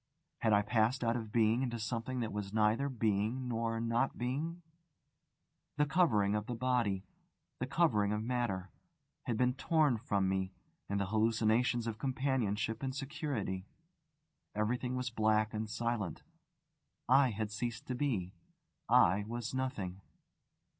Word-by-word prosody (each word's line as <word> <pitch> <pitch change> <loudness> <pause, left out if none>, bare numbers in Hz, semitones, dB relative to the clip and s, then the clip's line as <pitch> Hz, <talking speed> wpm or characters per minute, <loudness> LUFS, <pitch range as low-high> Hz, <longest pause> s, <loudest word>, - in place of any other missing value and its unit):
Had 110 - +2
I 105 0 +5
passed 120 +4 +2
out 115 0 +2
of 110 -3 -4
being 115 +1 +3
into 120 -3 -1
something 115 +3 -3
that 110 -3 -3
was 105 -1 -4
neither 110 +6 +2
being 115 +1 0
nor 115 -1 -1
not 115 +3 0
being? 155 +8 -3 1.1
The 150 - +4
covering 135 - +3
of 105 0 -1
the 120 - -3
body, 115 -6 +1 0.6
the 130 - -2
covering 125 -9 +2
of 105 0 -1
matter, 110 -7 -1 0.6
had 115 - 0
been 125 +1 +3
torn 145 -3 +2
from 100 -5 0
me, 95 0 -1 0.4
and 100 0 0
the 100 - 0
hallucinations 110 +3 +2
of 110 -2 -4
companionship 125 -5 0
and 130 -1 -3
security. 135 - -3 0.9
Everything 125 +4 0
was 125 -1 -2
black 110 -1 +2
and 110 0 -3
silent. 115 -4 -2 0.8
I 135 +1 +6
had 110 -1 -3
ceased 115 +1 -3
to 130 - -3
be. 115 -10 -1 0.6
I 105 -5 +5
was 120 +1 -4
nothing. 100 -8 -3
115 Hz, 140 wpm, -34 LUFS, 105-125 Hz, 1.1 s, I